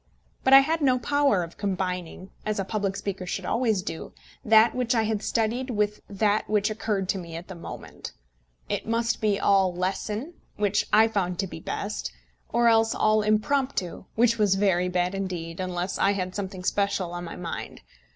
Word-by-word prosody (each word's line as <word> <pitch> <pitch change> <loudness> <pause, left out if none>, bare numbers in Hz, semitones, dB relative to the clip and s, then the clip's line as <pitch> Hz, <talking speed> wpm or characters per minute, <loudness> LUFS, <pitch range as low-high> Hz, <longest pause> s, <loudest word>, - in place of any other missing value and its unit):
But 265 - +3
I 270 - +11
had 320 +3 0
no 260 -3 +4
power 275 -6 +2
of 165 - -10
combining, 185 -2 -3
as 215 0 -2
a 195 - -1
public 200 -1 -2
speaker 195 -2 -4
should 185 +1 -3
always 220 -5 +1
do, 165 - -6 0.3
that 220 +1 +6
which 250 -1 0
I 225 - +3
had 215 -1 -1
studied 230 +4 -1
with 210 -2 -1
that 205 +1 +1
which 210 0 +2
occurred 210 -3 -2
to 195 - 0
me 170 -2 -8
at 170 +2 -7
the 190 - -7
moment. 170 - -9 0.6
It - - -3
must 230 +1 0
be 210 -2 +2
all 195 -2 +3
lesson, 210 - -3 0.2
which 210 0 +1
I 220 +1 +6
found 185 -5 -1
to 195 - 0
be 170 - -8
best; - - -4 0.4
or 235 0 +3
else 225 -1 +4
all 215 0 +3
impromptu, 215 -2 0
which 230 0 +3
was 205 -2 +4
very 185 -2 +2
bad 180 0 0
indeed, 180 -4 -4
unless 185 0 -3
I 200 - +3
had 185 -2 -3
something 190 -2 -5
special 200 -2 0
on 175 0 -5
my 165 - -7
mind. 170 -2 -6
205 Hz, 185 wpm, -26 LUFS, 185-225 Hz, 0.6 s, I